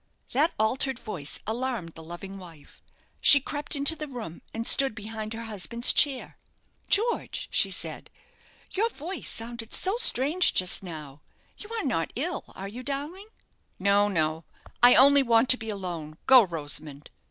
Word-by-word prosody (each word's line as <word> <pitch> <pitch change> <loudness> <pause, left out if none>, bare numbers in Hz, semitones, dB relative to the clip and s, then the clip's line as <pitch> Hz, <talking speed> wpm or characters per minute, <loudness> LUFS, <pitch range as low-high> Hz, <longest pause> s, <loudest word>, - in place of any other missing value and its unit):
That 295 +6 +1
altered 255 +4 0
voice 175 - -5
alarmed 230 -5 -3
the 160 - -11
loving 175 +4 -9
wife. 165 -5 -15 0.4
She 285 - +9
crept 290 +2 -4
into 285 +3 +2
the 305 -1 -7
room, 230 - -8
and 225 +1 -5
stood 270 -3 +4
behind 220 0 -6
her 230 - -7
husband's 225 +2 +1
chair. 275 -4 +1 0.5
"George," 460 +4 0
she - - +2
said, - - -4 0.6
"your 440 +4 0
voice 355 -1 -5
sounded 230 0 -4
so 385 +4 +1
strange 350 - +2
just 185 -1 +3
now; 155 -6 -10 0.3
you 420 - -11
are 455 - -3
not 225 - -2
ill, 325 +7 -4
are 195 - -7
you, 230 +5 -8
darling?" 290 - -5 0.5
"No, 200 +1 +2
no; 160 -4 -1 0.4
I 245 0 +7
only 280 +2 +6
want 235 -1 +2
to 255 - +6
be 225 -2 -7
alone. 175 -7 -6
Go, 260 -1 +8
Rosamond." 150 -3 -5
230 Hz, 155 wpm, -26 LUFS, 185-280 Hz, 0.6 s, She